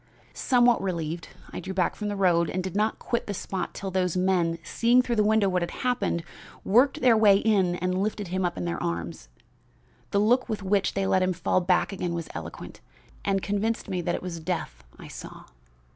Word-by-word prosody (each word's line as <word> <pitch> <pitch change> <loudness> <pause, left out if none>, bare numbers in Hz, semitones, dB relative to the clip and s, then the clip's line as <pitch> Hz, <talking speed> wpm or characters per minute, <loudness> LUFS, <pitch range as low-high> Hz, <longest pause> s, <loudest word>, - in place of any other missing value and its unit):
"Somewhat 245 -2 +3
relieved, 170 -3 -3 0.3
I - - -4
drew 190 0 -6
back 180 -2 +1
from 210 - -4
the 205 - -2
road, 175 -4 +2
but 185 0 -2
did 190 0 -5
not 215 +2 +1
quit 235 - -3
the 205 - -3
spot 185 -1 -4
till 195 0 -5
those 185 -1 0
men, 180 -3 +1
seeing 240 +8 +3
through 240 -2 -2
the 210 - +4
window 215 -1 +3
what 180 -1 +1
had 175 - -2 0.2
happened, 245 -9 0 0.4
worked 265 +8 +3
their 245 -3 +6
way 210 -3 +6
in 195 -5 +2
and 185 +1 -1
lifted 205 -2 -2
him 185 +1 -1
up 175 - -1
in 90 - -3
their 85 0 -3
arms. 85 -7 -4 0.8
The - - 0
look 245 +5 +2
with 215 -3 -3
which 195 0 +1
they 195 0 0
let 190 -1 +2
him 185 0 +1
fall 180 +1 +1
back 180 +2 +1
again 175 -3 -3
was 165 -2 -5
eloquent, 85 0 -8 0.4
and 195 -1 0
convinced 205 +2 -1
me 185 -2 -1
that - - -1
it - - -6
was 175 -2 -5
death 160 - -4
I - - -11
saw. - - -10
190 Hz, 210 wpm, -26 LUFS, 175-210 Hz, 0.8 s, their